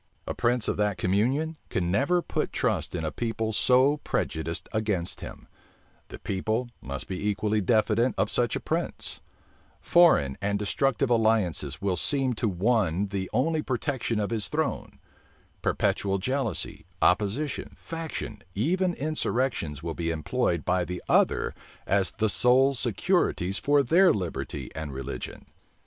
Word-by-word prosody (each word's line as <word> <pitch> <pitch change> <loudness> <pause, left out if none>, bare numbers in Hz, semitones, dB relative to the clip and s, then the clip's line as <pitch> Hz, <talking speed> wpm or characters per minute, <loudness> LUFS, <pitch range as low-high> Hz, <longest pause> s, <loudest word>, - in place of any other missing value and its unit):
A - - -3
prince 120 -1 +1
of - - 0
that 105 -1 +1
communion 130 - +1
can 90 -1 -1
never 170 - +2
put - - -2
trust - - -1
in 80 -2 -2
a 80 - -1
people 115 -1 -2
so 130 +6 +4
prejudiced 80 - -3
against 105 -6 -1
him: - - -9 0.6
the - - -9
people 110 +5 -2
must 70 0 -4
be 95 +2 -2
equally 105 +1 0
diffident 115 +4 +2
of - - +1
such 120 -2 +1
a - - -1
prince: - - -3 0.6
foreign 115 - +4
and 100 0 0
destructive 125 +5 0
alliances 100 - +1
will 95 -3 +1
seem 135 - 0
to 115 +1 -1
one 100 -1 +1
the 95 -1 -3
only 155 +7 +1
protection 130 -4 -2
of 105 +1 -1
his 110 -4 +1
throne: - - -2 0.6
perpetual 100 -1 +1
jealousy, 120 - -1 0.2
opposition, 105 +10 +1
faction, 160 -10 -6
even 175 - +1
insurrections 130 - -1
will 85 -1 -3
be 85 0 -2
employed 85 +2 -1
by 90 0 +2
the 90 0 -5
other - - +2 0.3
as 95 -1 +1
the 110 0 +1
sole 130 +6 +4
securities 120 - +1
for 145 0 +3
their 175 +8 +5
liberty 85 -10 -4
and 80 -3 -5
religion. 65 -1 -6
110 Hz, 140 wpm, -27 LUFS, 90-130 Hz, 0.6 s, their